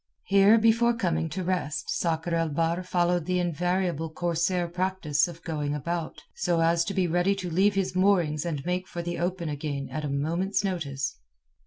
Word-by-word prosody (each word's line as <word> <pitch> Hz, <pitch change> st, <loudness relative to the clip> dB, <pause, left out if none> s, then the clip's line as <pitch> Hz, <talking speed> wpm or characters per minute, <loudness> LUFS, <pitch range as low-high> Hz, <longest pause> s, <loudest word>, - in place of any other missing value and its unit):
Here 200 Hz, +3 st, +5 dB
before 230 Hz, +1 st, +3 dB
coming 165 Hz, -6 st, 0 dB
to 185 Hz, +3 st, -4 dB
rest, 180 Hz, -5 st, -2 dB
Sakr 165 Hz, 0 st, -1 dB
el 165 Hz, -1 st, +1 dB
Bahr 165 Hz, +3 st, 0 dB
followed 175 Hz, -2 st, +1 dB
the 180 Hz, 0 st, +1 dB
invariable 175 Hz, -1 st, 0 dB
corsair 175 Hz, +2 st, 0 dB
practice 175 Hz, -3 st, 0 dB
of 170 Hz, -1 st, -10 dB
going 150 Hz, -3 st, -2 dB
about, 155 Hz, 0 st, -4 dB
so 175 Hz, -2 st, 0 dB
as 165 Hz, +1 st, +3 dB
to 200 Hz, -, -4 dB
be 190 Hz, -2 st, +2 dB
ready 175 Hz, +3 st, +2 dB
to 185 Hz, -3 st, -5 dB
leave 195 Hz, +4 st, +3 dB
his 195 Hz, -2 st, -1 dB
moorings 180 Hz, -6 st, +2 dB
and 150 Hz, -5 st, -3 dB
make 180 Hz, +1 st, -1 dB
for 170 Hz, -, -5 dB
the 175 Hz, -1 st, -3 dB
open 175 Hz, 0 st, -2 dB
again 145 Hz, -2 st, -4 dB
at 155 Hz, -, -4 dB
a 145 Hz, -, -2 dB
moment's 170 Hz, +9 st, 0 dB
notice. 140 Hz, -, -2 dB
175 Hz, 180 wpm, -27 LUFS, 160-185 Hz, -, Here